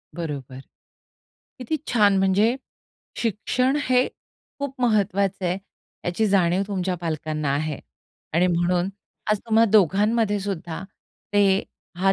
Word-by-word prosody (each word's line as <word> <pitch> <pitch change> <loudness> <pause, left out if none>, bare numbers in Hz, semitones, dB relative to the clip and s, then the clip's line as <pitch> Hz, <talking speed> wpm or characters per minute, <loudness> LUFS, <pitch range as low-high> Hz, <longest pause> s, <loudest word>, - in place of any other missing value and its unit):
बरोबर. 140 -6 -5 1.0
किती 255 +5 -2
छान! 205 -4 +4
म्हणजे, 200 +6 +3 0.6
शिक्षण 250 +4 0
हे 255 -1 +3 0.5
खूप 280 -2 -5
महत्वाचं 200 -4 +1
आहे, 180 +2 0 0.5
याची 180 +5 +1
जाणीव 190 -2 +3
तुमच्या 190 -2 -1
पालकांना 155 -3 -2
आहे. 150 0 -2 0.6
आणि 175 +2 +4
म्हणून, 175 +1 +1 0.4
आज 210 - +3
तुम्हा 225 0 +5
दोघांमध्ये 210 +2 +3
सुद्धा, 185 -4 -4 0.5
ते 200 -1 +4 0.4
हा 195 +1 +4
195 Hz, 110 wpm, -24 LUFS, 175-220 Hz, 1.0 s, तुम्हा